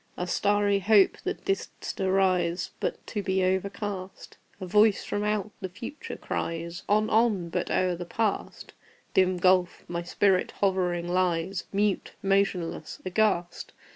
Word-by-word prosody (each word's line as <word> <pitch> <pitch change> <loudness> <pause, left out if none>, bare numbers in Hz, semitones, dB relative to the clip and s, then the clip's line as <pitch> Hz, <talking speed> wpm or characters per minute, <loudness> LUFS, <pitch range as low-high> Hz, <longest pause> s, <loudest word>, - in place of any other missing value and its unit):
Ah, 180 - -2
starry 205 +2 +2
Hope! 200 0 +4
that - - -4
didst 195 0 -3
arise 185 -2 +1
But - - -3
to 210 - -3
be 190 -1 0
overcast! 190 0 -3 0.2
A 185 - -5
voice 210 +3 +4
from 205 - -2
out 210 0 -1
the 190 - -4
Future 230 +10 -7
cries, 170 +2 -4
"On! 215 +1 +3
on!" 215 -6 +2
but - - -2
o'er 185 -1 +1
the 175 - -5
Past 220 +2 -2 0.4
(Dim 185 -1 +3
gulf!) 180 0 +2
my 170 0 -3
spirit 185 +2 +1
hovering 180 -3 0
lies 180 0 0
Mute, 205 0 0
motionless, 195 -3 0
aghast! 185 -3 0
190 Hz, 140 wpm, -27 LUFS, 180-205 Hz, 0.4 s, Hope